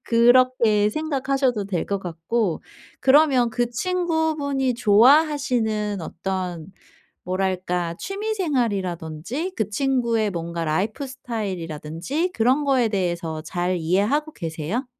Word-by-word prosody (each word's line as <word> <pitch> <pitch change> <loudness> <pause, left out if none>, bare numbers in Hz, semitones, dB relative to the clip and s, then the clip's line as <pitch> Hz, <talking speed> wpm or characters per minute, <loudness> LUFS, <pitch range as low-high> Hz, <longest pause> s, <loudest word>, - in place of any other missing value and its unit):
그렇게 235 -3 +4
생각하셔도 270 -5 0
될 185 -4 -2
것 200 - -1
같고 175 +2 -2 0.4
그러면 265 -3 +5
그 240 +1 -1
친구분이 315 -5 0
좋아하시는 235 -3 +3
어떤 180 -1 -4 0.6
뭐랄까 180 -2 -1
취미 420 +3 -3
생활이라든지 230 - -2
그 215 -2 -1
친구의 235 -3 +1
뭔가 170 -1 -4
라이프스타일이라든지 205 - -3
그런 255 +6 +2
거에 265 -5 +3
대해서 170 -5 -2
잘 175 +3 -2
이해하고 205 - +1
계세요? 165 - -4
220 Hz, 275 characters per minute, -23 LUFS, 180-270 Hz, 0.6 s, 그러면